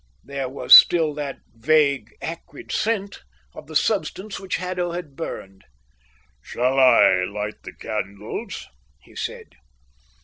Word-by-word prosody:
There 140 Hz, -2 st, -5 dB
was 135 Hz, -, +2 dB
still 160 Hz, -3 st, +8 dB
that 145 Hz, -2 st, -6 dB
vague, 140 Hz, -1 st, +1 dB
acrid 165 Hz, +1 st, -8 dB
scent 210 Hz, -2 st, -2 dB, 0.3 s
of -, -, -12 dB
the -, -, -11 dB
substance 195 Hz, 0 st, -1 dB
which 190 Hz, -1 st, -3 dB
Haddo 180 Hz, -1 st, -3 dB
had 170 Hz, -6 st, -7 dB
burned. 95 Hz, -, -7 dB, 0.8 s
"Shall 130 Hz, +2 st, -1 dB
I 115 Hz, -8 st, +5 dB
light 105 Hz, +2 st, -6 dB
the -, -, -10 dB
candles?" 100 Hz, -2 st, -6 dB, 0.3 s
he -, -, -21 dB
said. -, -, -6 dB
140 Hz, 125 wpm, -22 LUFS, 115-175 Hz, 0.8 s, still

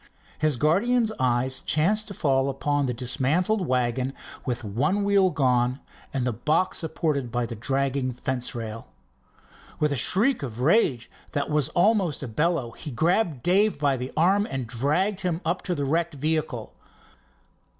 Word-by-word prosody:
His 155 Hz, -4 st, +1 dB
guardian's 220 Hz, -, +2 dB
eye 125 Hz, 0 st, +2 dB, 0.2 s
chanced 205 Hz, +9 st, +1 dB
to 200 Hz, -, -7 dB
fall 135 Hz, -4 st, +1 dB
upon 145 Hz, +1 st, 0 dB
the -, -, 0 dB
dismantled 160 Hz, -, 0 dB
wagon 125 Hz, +1 st, 0 dB, 0.3 s
with 120 Hz, -1 st, -2 dB
one 140 Hz, -, 0 dB
wheel 200 Hz, -2 st, +4 dB
gone 125 Hz, -4 st, +1 dB, 0.3 s
and 130 Hz, -2 st, -1 dB
the 125 Hz, -, 0 dB
box 155 Hz, -, 0 dB
supported 155 Hz, -6 st, -2 dB
by 120 Hz, 0 st, 0 dB
the 115 Hz, -, -6 dB
dragging 135 Hz, +2 st, 0 dB
fence 125 Hz, 0 st, -3 dB
rail. 115 Hz, -1 st, -6 dB, 0.9 s
With 150 Hz, -1 st, +2 dB
a -, -, +1 dB
shriek 210 Hz, -, +3 dB
of 120 Hz, -5 st, -6 dB
rage 135 Hz, -, +2 dB, 0.3 s
that 145 Hz, +1 st, -1 dB
was 150 Hz, -3 st, +2 dB
almost 185 Hz, -5 st, +2 dB
a -, -, -4 dB
bellow 145 Hz, 0 st, 0 dB
he 150 Hz, -, -8 dB
grabbed 160 Hz, -, 0 dB
Dave 200 Hz, +4 st, +3 dB
by 140 Hz, -2 st, +1 dB
the 125 Hz, +1 st, -5 dB
arm 195 Hz, +6 st, +3 dB
and 135 Hz, -2 st, -3 dB
dragged 150 Hz, -, 0 dB
him 175 Hz, -3 st, -1 dB
up 175 Hz, +3 st, 0 dB
to 180 Hz, -, -1 dB
the 145 Hz, -2 st, -2 dB
wrecked 165 Hz, +3 st, 0 dB
vehicle. 150 Hz, -5 st, -2 dB
145 Hz, 160 wpm, -25 LUFS, 125-175 Hz, 0.9 s, wheel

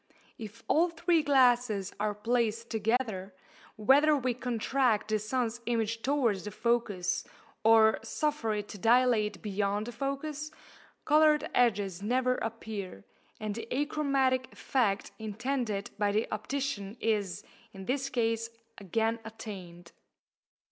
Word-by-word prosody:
If 225 Hz, 0 st, -9 dB
all 340 Hz, +3 st, +3 dB
three 335 Hz, 0 st, +2 dB
glasses 245 Hz, -8 st, +3 dB
are 210 Hz, 0 st, 0 dB
placed 230 Hz, +1 st, -1 dB
together, 220 Hz, -4 st, -1 dB, 0.4 s
whether 285 Hz, +7 st, +5 dB
we 255 Hz, -2 st, 0 dB
contract 245 Hz, -2 st, 0 dB
the 215 Hz, 0 st, +1 dB
sun's 235 Hz, +2 st, -2 dB
image 225 Hz, -1 st, 0 dB
towards 240 Hz, -9 st, +1 dB
the -, -, -3 dB
focus, 210 Hz, -4 st, 0 dB, 0.4 s
or 220 Hz, 0 st, +6 dB
suffer 295 Hz, -8 st, -1 dB
it 210 Hz, 0 st, -4 dB
to 205 Hz, -, -8 dB
dilate 230 Hz, -2 st, +3 dB
beyond 205 Hz, 0 st, -1 dB
the 240 Hz, -, -6 dB
focus, 275 Hz, +4 st, -4 dB, 0.6 s
coloured 305 Hz, 0 st, +4 dB
edges 200 Hz, -6 st, +1 dB
never 255 Hz, +4 st, +1 dB
appear, 215 Hz, -, -5 dB, 0.4 s
and 215 Hz, -1 st, -3 dB
the 225 Hz, +1 st, -6 dB
achromatic 275 Hz, -2 st, +1 dB
effect 215 Hz, -7 st, 0 dB
intended 220 Hz, -1 st, -3 dB
by 205 Hz, -1 st, +2 dB
the 215 Hz, +2 st, 0 dB
optician 215 Hz, -2 st, -3 dB
is, 205 Hz, -5 st, -1 dB, 0.3 s
in 195 Hz, -2 st, -9 dB
this 270 Hz, +3 st, -1 dB
case, 230 Hz, -2 st, 0 dB, 0.3 s
again 225 Hz, +4 st, 0 dB
attained. 185 Hz, -6 st, -9 dB
225 Hz, 120 wpm, -30 LUFS, 210-255 Hz, 0.6 s, or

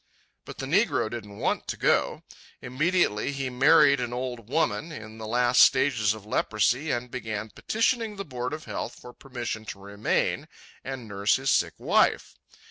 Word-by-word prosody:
But -, -, -10 dB
the 135 Hz, -, -4 dB
negro 150 Hz, -, +1 dB
didn't 105 Hz, -4 st, -7 dB
want -, -, -1 dB
to -, -, -4 dB
go. -, -, +1 dB, 0.4 s
Immediately 140 Hz, -, 0 dB
he 135 Hz, -2 st, -3 dB
married 140 Hz, +2 st, +5 dB
an 120 Hz, -1 st, -3 dB
old 125 Hz, -3 st, -5 dB
woman, 150 Hz, 0 st, 0 dB
in 110 Hz, -6 st, -9 dB
the 110 Hz, -, -6 dB
last 120 Hz, +2 st, +3 dB
stages 120 Hz, -6 st, +4 dB
of 105 Hz, -2 st, -12 dB
leprosy, 115 Hz, +7 st, 0 dB
and 125 Hz, -2 st, -2 dB
began 110 Hz, -3 st, -5 dB
petitioning 225 Hz, -1 st, 0 dB
the 200 Hz, 0 st, -6 dB
Board 125 Hz, -3 st, -4 dB
of 155 Hz, 0 st, -6 dB
Health -, -, -5 dB
for 125 Hz, -, -12 dB
permission 120 Hz, -5 st, -6 dB
to 100 Hz, -, -7 dB
remain 100 Hz, +1 st, -1 dB, 0.4 s
and 130 Hz, -3 st, -6 dB
nurse 100 Hz, 0 st, +1 dB
his 135 Hz, 0 st, 0 dB
sick -, -, +2 dB
wife. -, -, +2 dB
125 Hz, 165 wpm, -26 LUFS, 110-140 Hz, 0.4 s, married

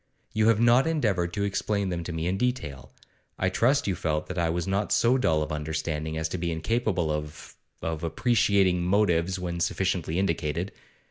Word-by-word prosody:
You 110 Hz, 0 st, +2 dB
have 115 Hz, -2 st, +4 dB
not 120 Hz, +4 st, +5 dB
endeavoured 105 Hz, -, 0 dB
to 100 Hz, -, -1 dB
explain 100 Hz, 0 st, -1 dB
them 85 Hz, -2 st, -3 dB
to 90 Hz, -, -4 dB
me 80 Hz, 0 st, -3 dB
in 90 Hz, +2 st, 0 dB
detail; 95 Hz, -, -3 dB, 0.5 s
I 95 Hz, -, +1 dB
trust 130 Hz, +9 st, +2 dB
you 100 Hz, -, +1 dB
felt 75 Hz, -3 st, -1 dB
that 90 Hz, -, -5 dB
I 85 Hz, -1 st, +1 dB
was 85 Hz, +1 st, -1 dB
not 100 Hz, +2 st, -1 dB
so 120 Hz, +2 st, +4 dB
dull 80 Hz, -12 st, +2 dB
of 75 Hz, -, -6 dB
understanding 80 Hz, +1 st, -3 dB
as 80 Hz, 0 st, -1 dB
to 90 Hz, -, -4 dB
be 85 Hz, 0 st, -1 dB
incapable 90 Hz, 0 st, 0 dB
of 75 Hz, 0 st, -6 dB, 0.3 s
of 80 Hz, -1 st, -3 dB
appreciating 95 Hz, 0 st, +2 dB
motives 95 Hz, -1 st, +2 dB
when 85 Hz, -1 st, -4 dB
sufficiently 90 Hz, -2 st, -1 dB
indicated. 85 Hz, -1 st, -1 dB
90 Hz, 185 wpm, -27 LUFS, 80-100 Hz, 0.5 s, not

